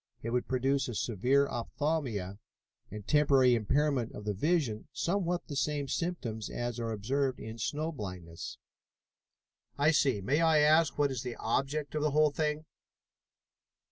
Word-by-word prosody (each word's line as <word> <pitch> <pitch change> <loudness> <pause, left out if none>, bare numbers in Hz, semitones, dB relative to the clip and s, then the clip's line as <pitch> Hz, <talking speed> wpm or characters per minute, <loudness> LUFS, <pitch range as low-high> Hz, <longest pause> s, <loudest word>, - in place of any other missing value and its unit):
It 115 - -3
would 125 0 0
produce 135 +1 +1
a 120 - -5
severe 125 +7 +2
opthalmia 120 - -2 0.5
and 105 +1 -8
temporary 135 -4 +5
impairment 130 +2 +1
of 105 - -8
the 105 - 0
vision, 135 - 0
somewhat 175 +2 -1
the 145 - -6
same 140 +2 -1
symptoms 130 -10 -3
as 120 0 -3
are 115 -1 -2
observed 130 +5 -1
in 110 +1 -8
snow 155 +8 -2
blindness." 90 - -7 1.2
"I 145 +2 +4
see. 135 -7 +2
May 135 - +1
I 160 -2 +4
ask 155 0 +4
what 145 -1 +2
is 130 -3 -3
the 125 -2 -5
object 140 +6 -1
of 155 - -1
the 150 - +2
whole 150 +1 +3
thing?" 150 +1 -1
135 Hz, 150 wpm, -31 LUFS, 115-150 Hz, 1.2 s, temporary